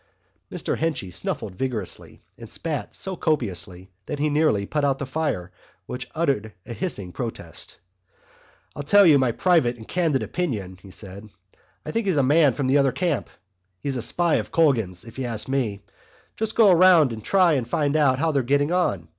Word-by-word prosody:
Mr -, -, -3 dB
Henchy 155 Hz, -, -2 dB
snuffled 90 Hz, -, -4 dB
vigorously 115 Hz, -5 st, -5 dB
and -, -, -11 dB
spat -, -, -4 dB
so 190 Hz, -1 st, -4 dB
copiously 95 Hz, -, -2 dB, 0.2 s
that -, -, -3 dB
he 150 Hz, +1 st, 0 dB
nearly 145 Hz, -10 st, +2 dB
put 150 Hz, +7 st, -2 dB
out 140 Hz, -2 st, +2 dB
the 140 Hz, -, -4 dB
fire, 130 Hz, -, -2 dB, 0.3 s
which 125 Hz, +4 st, -6 dB
uttered 135 Hz, -, 0 dB
a 120 Hz, -, -6 dB
hissing 105 Hz, -, -3 dB
protest. 115 Hz, +3 st, -5 dB, 1.0 s
"To 145 Hz, -, -4 dB
tell 200 Hz, +8 st, +5 dB
you 150 Hz, -5 st, +6 dB
my 130 Hz, -2 st, +2 dB
private 130 Hz, -4 st, +2 dB
and 110 Hz, -, -12 dB
candid 165 Hz, -7 st, 0 dB
opinion," 105 Hz, -, -3 dB
he 100 Hz, -, -13 dB
said, 100 Hz, +2 st, -8 dB, 0.6 s
"I -, -, -4 dB
think 225 Hz, -2 st, -1 dB
he's 180 Hz, -5 st, +2 dB
a 140 Hz, -, +4 dB
man 145 Hz, 0 st, +4 dB
from 140 Hz, -, -2 dB
the 135 Hz, +2 st, +3 dB
other 135 Hz, -1 st, +3 dB
camp. 170 Hz, -6 st, -1 dB, 0.5 s
He's 140 Hz, +4 st, -3 dB
a 125 Hz, -, -2 dB
spy 170 Hz, +7 st, +2 dB
of -, -, -4 dB
Colgan's, 115 Hz, -, +1 dB
if 115 Hz, +2 st, -11 dB
you 130 Hz, -, -2 dB
ask 115 Hz, -3 st, -2 dB
me. 120 Hz, -7 st, -2 dB, 0.5 s
Just 220 Hz, 0 st, -3 dB
go 215 Hz, -4 st, +6 dB
round 170 Hz, -7 st, +6 dB
and 110 Hz, -1 st, -8 dB
try 185 Hz, -, +4 dB
and 130 Hz, -5 st, -1 dB
find 145 Hz, +3 st, 0 dB
out 140 Hz, -4 st, +3 dB
how 160 Hz, +3 st, +1 dB
they're 140 Hz, -2 st, +1 dB
getting 145 Hz, +5 st, +1 dB
on. 100 Hz, -, 0 dB
135 Hz, 190 wpm, -24 LUFS, 110-160 Hz, 1.0 s, you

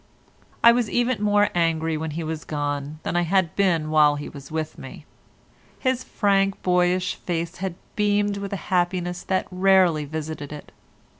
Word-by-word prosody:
I 235 Hz, -, +9 dB
was 235 Hz, -2 st, +1 dB
even 240 Hz, -2 st, 0 dB
more 205 Hz, 0 st, +3 dB
angry 165 Hz, -2 st, +1 dB
when 160 Hz, +1 st, -3 dB
he 170 Hz, -, -2 dB
was 155 Hz, -1 st, -4 dB
gone 145 Hz, 0 st, -3 dB
than -, -, -3 dB
I 175 Hz, -, +3 dB
had 175 Hz, -1 st, +1 dB
been 170 Hz, -6 st, +1 dB
while 150 Hz, -1 st, +5 dB
he 145 Hz, -, -6 dB
was 140 Hz, -2 st, -11 dB
with 155 Hz, 0 st, -4 dB
me. -, -, -10 dB, 0.7 s
His 255 Hz, -1 st, 0 dB
frank, 195 Hz, -2 st, +1 dB
boyish 180 Hz, 0 st, +2 dB
face 170 Hz, 0 st, -4 dB
had 190 Hz, -2 st, -4 dB, 0.2 s
beamed 205 Hz, -1 st, +1 dB
with 200 Hz, -1 st, -5 dB
a -, -, -1 dB, 0.2 s
happiness 175 Hz, 0 st, 0 dB
that 190 Hz, -1 st, 0 dB
had 185 Hz, 0 st, -10 dB
rarely 185 Hz, -6 st, +4 dB
visited 155 Hz, -1 st, -6 dB
it. 150 Hz, -1 st, -9 dB
175 Hz, 170 wpm, -24 LUFS, 155-195 Hz, 0.7 s, I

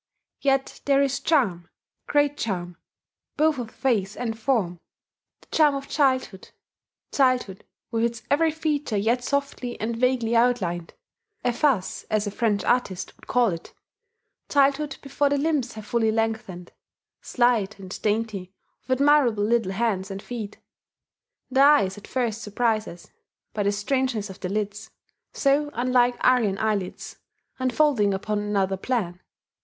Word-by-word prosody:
Yet 270 Hz, -1 st, 0 dB
there 275 Hz, 0 st, +4 dB
is 275 Hz, -1 st, 0 dB
charm 200 Hz, -, +1 dB, 0.4 s
great 290 Hz, 0 st, +2 dB
charm 180 Hz, -8 st, -4 dB, 0.6 s
both 310 Hz, -2 st, +2 dB
of 235 Hz, -2 st, -5 dB
face 215 Hz, -6 st, -1 dB
and 230 Hz, -2 st, -2 dB
form: 220 Hz, -8 st, 0 dB, 0.6 s
the -, -, -22 dB
charm 300 Hz, -3 st, +4 dB
of 275 Hz, 0 st, -5 dB
childhood 260 Hz, -9 st, 0 dB, 0.6 s
childhood 255 Hz, -8 st, +1 dB, 0.3 s
with 230 Hz, 0 st, +1 dB
its 230 Hz, -1 st, -3 dB
every 320 Hz, +3 st, +4 dB
feature 300 Hz, -7 st, -1 dB
yet 235 Hz, +5 st, +1 dB
softly 280 Hz, -3 st, -2 dB
and 230 Hz, +2 st, -2 dB
vaguely 240 Hz, -1 st, +1 dB
outlined 200 Hz, -9 st, +1 dB, 0.5 s
(efface, 245 Hz, -4 st, +1 dB
as 215 Hz, -1 st, +1 dB
a 205 Hz, -, -3 dB
French 210 Hz, -2 st, 0 dB
artist 200 Hz, -7 st, 0 dB
would -, -, -19 dB
call 245 Hz, -2 st, +3 dB
it), 165 Hz, -3 st, -7 dB, 0.7 s
childhood 280 Hz, 0 st, +2 dB
before 280 Hz, +1 st, +1 dB
the 285 Hz, -, +1 dB
limbs 285 Hz, -4 st, 0 dB
have 215 Hz, -1 st, -9 dB
fully 225 Hz, 0 st, +1 dB
lengthened, 220 Hz, -5 st, -2 dB, 0.5 s
slight 235 Hz, -5 st, +1 dB
and, 190 Hz, -1 st, -8 dB
dainty, 210 Hz, -3 st, -1 dB, 0.4 s
with 260 Hz, 0 st, +1 dB
admirable 280 Hz, -8 st, +4 dB
little 225 Hz, -3 st, +1 dB
hands 195 Hz, -3 st, -1 dB
and 195 Hz, 0 st, -6 dB
feet. 220 Hz, -4 st, -6 dB, 0.9 s
The 265 Hz, +1 st, +3 dB
eyes 215 Hz, -10 st, +5 dB
at 205 Hz, -, -12 dB
first 230 Hz, -4 st, -1 dB
surprise 215 Hz, +1 st, 0 dB
us, 170 Hz, 0 st, -11 dB, 0.4 s
by 210 Hz, -, -2 dB
the 200 Hz, 0 st, +2 dB
strangeness 215 Hz, 0 st, -1 dB
of 190 Hz, -, -13 dB
their 180 Hz, -, -4 dB
lids, 210 Hz, +2 st, -3 dB, 0.4 s
so 285 Hz, +1 st, +2 dB
unlike 245 Hz, 0 st, +2 dB
Aryan 230 Hz, -6 st, +3 dB
eyelids, 210 Hz, -4 st, -2 dB, 0.4 s
and 255 Hz, 0 st, 0 dB
folding 235 Hz, -8 st, +3 dB
upon 210 Hz, +2 st, -2 dB
another 200 Hz, -2 st, 0 dB
plan. 190 Hz, -5 st, -2 dB
230 Hz, 140 wpm, -25 LUFS, 205-265 Hz, 0.9 s, eyes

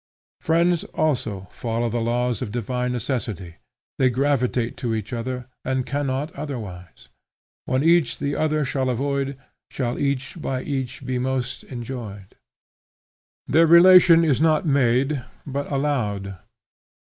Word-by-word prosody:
Friends 170 Hz, +1 st, +2 dB
also 110 Hz, -11 st, -1 dB
follow 115 Hz, 0 st, -2 dB
the 115 Hz, +1 st, -1 dB
laws 120 Hz, +1 st, 0 dB
of 120 Hz, -5 st, -4 dB
divine 125 Hz, +2 st, -2 dB
necessity; 110 Hz, -8 st, -4 dB, 0.4 s
they 130 Hz, -, +4 dB
gravitate 125 Hz, -2 st, 0 dB
to 120 Hz, -4 st, -2 dB
each 110 Hz, +2 st, -5 dB
other, 125 Hz, +1 st, -4 dB, 0.2 s
and 130 Hz, -1 st, -1 dB
cannot 140 Hz, +1 st, -2 dB
otherwise: 105 Hz, -, -8 dB, 0.6 s
When 130 Hz, +2 st, 0 dB
each 165 Hz, -3 st, +3 dB
the 140 Hz, 0 st, -2 dB
other 155 Hz, -1 st, +1 dB
shall 130 Hz, 0 st, -1 dB
avoid, 140 Hz, +2 st, -1 dB, 0.3 s
Shall 120 Hz, -3 st, -3 dB
each 140 Hz, +3 st, -2 dB
by 130 Hz, -2 st, -2 dB
each 135 Hz, -2 st, -4 dB
be 130 Hz, -1 st, -1 dB
most 130 Hz, 0 st, -2 dB
enjoyed. 115 Hz, -6 st, -7 dB, 1.1 s
Their 165 Hz, +3 st, +4 dB
relation 170 Hz, 0 st, +8 dB
is 150 Hz, -4 st, +2 dB
not 160 Hz, +1 st, +3 dB
made, 135 Hz, -1 st, +2 dB, 0.2 s
but 140 Hz, +1 st, -4 dB
allowed. 105 Hz, -10 st, -1 dB
130 Hz, 125 wpm, -23 LUFS, 120-145 Hz, 1.1 s, relation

